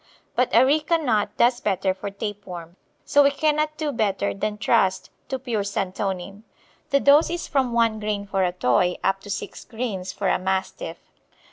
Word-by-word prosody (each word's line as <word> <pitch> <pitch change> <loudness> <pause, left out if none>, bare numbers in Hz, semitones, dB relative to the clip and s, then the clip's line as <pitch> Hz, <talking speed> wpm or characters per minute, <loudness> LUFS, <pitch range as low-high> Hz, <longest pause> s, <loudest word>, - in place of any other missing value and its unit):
But 250 0 +2
areca 295 +7 +4
nut 230 -10 +1
does 240 +1 +3
better 190 -3 0
for 190 +2 -6
tape 205 0 -6
worm, 175 -1 -8 0.3
so 285 - +5
we 280 - +6
cannot 305 +1 0
do 305 -1 -1
better 200 -4 0
than 210 +1 -3
trust 190 -3 +1 0.2
to 265 - -1
pure 240 -5 -2
santonin. 195 0 -3 0.5
The 280 -2 +3
dose 285 +4 +5
is 345 0 -3
from 265 -4 +1
1 230 -2 +2
grain 210 -1 -2
for 195 -1 0
a 180 - +1
Toy 180 +1 +2
up 195 0 +1
to 205 - -12
6 200 - -5
grains 220 -6 -4
for 195 -1 -3
a - - +2
Mastiff. 190 - -3
210 Hz, 175 wpm, -24 LUFS, 195-265 Hz, 0.5 s, we